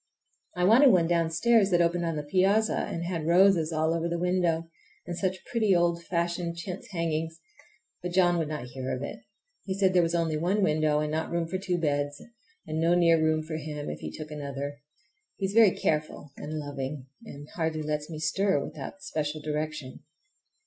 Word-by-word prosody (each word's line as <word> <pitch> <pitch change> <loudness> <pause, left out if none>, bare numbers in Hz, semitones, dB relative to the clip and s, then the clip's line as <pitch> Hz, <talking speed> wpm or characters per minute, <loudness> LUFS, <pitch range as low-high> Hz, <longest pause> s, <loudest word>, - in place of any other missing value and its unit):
I 180 - +1
wanted 235 +9 +7
one 175 -4 +4
downstairs 175 +6 +3
that 175 -2 +3
opened 170 0 +2
on 165 -1 -1
the 150 - -3
piazza 195 +7 +2
and 170 - -4
had 170 -3 -3
roses 175 -2 +4
all 160 0 +1
over 170 0 -1
the 170 - -1
window, 175 -2 0 0.4
and 175 - -4
such 185 0 -2
pretty 215 -5 +2
old 170 -1 +1
fashioned 170 0 -2
chintz 175 +2 -6
hangings! 165 -2 -2 0.6
but 180 0 -4
John 175 -1 +3
would 160 - -1
not 150 -4 -4
hear 130 +1 -4
of 130 - -5
it. - - -6 0.5
He 190 - -2
said 190 -1 +3
there 180 - +5
was 170 0 0
only 165 -2 0
one 190 +6 +1
window 155 -2 +2
and 150 0 -2
not 160 +1 -2
room 170 -1 -1
for 185 +3 -3
two 185 -2 -1
beds, 145 -3 -1 0.5
and 155 0 -3
no 170 +1 +4
near 170 -2 +4
room 155 0 +2
for 155 0 -5
him 150 -1 -5
if 75 - -7
he 75 - -5
took 155 - -8
another. 140 -1 -5 0.5
He 195 - -2
is 190 - -3
very 225 -2 +7
careful 150 -1 -2
and 155 +1 -6
loving, 140 -2 -5 0.2
and 145 -9 -10
hardly 160 -2 -2
lets 150 0 -3
me 160 - -6
stir 160 +3 +1
without 155 +7 -7
special 155 -4 -3
direction. 150 -3 -4
165 Hz, 195 wpm, -28 LUFS, 150-180 Hz, 0.6 s, wanted